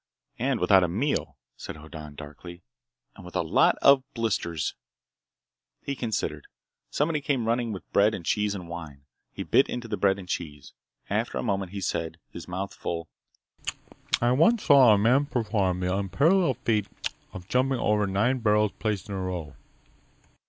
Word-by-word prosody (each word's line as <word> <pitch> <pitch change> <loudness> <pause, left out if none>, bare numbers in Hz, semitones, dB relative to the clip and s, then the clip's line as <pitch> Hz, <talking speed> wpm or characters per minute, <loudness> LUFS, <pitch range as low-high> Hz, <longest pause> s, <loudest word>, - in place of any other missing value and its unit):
"And 130 +1 0
without 95 +1 +5
a - - +2
meal," 115 - -1 0.2
said - - -8
Hoddan 75 -1 -10
darkly, 80 +4 -10 0.5
"and - - -12
with - - -11
a - - +1
lot - - +4
of 140 -1 +7
blisters!" 90 - -1 1.1
He 140 - -3
considered. 115 -4 -3 0.4
Somebody 150 0 0
came 135 -4 0
running 115 0 0
with 95 - -7
bread 105 +2 +4
and 85 - -8
cheese 105 +1 +1
and 90 -3 -7
wine. 80 -5 -8 0.3
He - - -5
bit - - +3
into 120 -1 -4
the 105 -2 -3
bread 95 -1 +3
and 95 -2 -9
cheese. 75 -6 -5 0.3
After - - -1
a - - -2
moment 95 -2 -1
he 100 -1 -5
said, 80 -2 -2
his 85 - -9
mouth 95 +2 -4
full: 85 -1 -4 1.1
"I 120 +1 +2
once 165 - +4
saw 135 -5 +7
a 105 - +6
man 125 +7 +3
perform 105 -8 0
the 90 +1 0
unparalleled 135 - +2
feat 105 -3 +2 0.4
of 90 -1 -9
jumping 130 +3 +1
over 105 -2 +1
nine 110 +7 +1
barrels 105 -2 +3
placed 105 -4 -2
in 100 - -6
a 95 - -3
row. 90 -5 -4
100 Hz, 165 wpm, -27 LUFS, 90-120 Hz, 1.1 s, of